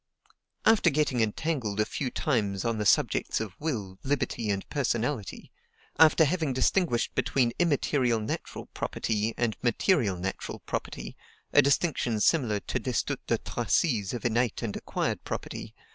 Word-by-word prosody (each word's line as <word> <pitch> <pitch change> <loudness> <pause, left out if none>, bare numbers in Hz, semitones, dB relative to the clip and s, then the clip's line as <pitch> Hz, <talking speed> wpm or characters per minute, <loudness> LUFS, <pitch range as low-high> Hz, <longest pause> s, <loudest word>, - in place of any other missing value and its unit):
After 220 -5 +5
getting 140 -5 +1
entangled 110 -1 -1
a 105 - +3
few 130 +3 -3
times 110 - -1
on 115 -2 0
the 105 - +1
subjects - - +2
of 110 -4 -4
will, 105 -12 -3
liberty, 130 -5 -1
and 100 -1 -1
personality; 125 -4 -2 0.5
after 160 0 +7
having 160 -3 0
distinguished 130 -1 +1
between 120 -3 +1
IMMATERIAL 140 -7 +2
NATURAL 105 - -5
property, 110 0 -1
and 120 -3 0
MATERIAL 120 - +2
NATURAL 95 +2 -5
property, - - -5 0.4
a - - +8
distinction 140 -5 +1
similar 115 -5 +2
to - - -2
Destutt 130 +2 -1
de 115 - +2
Tracy's 115 - 0
of 120 -2 -5
innate 120 0 +1
and 110 -3 -3
acquired - - -2
property, - - -6
M. - - -28
120 Hz, 145 wpm, -28 LUFS, 110-145 Hz, 0.5 s, a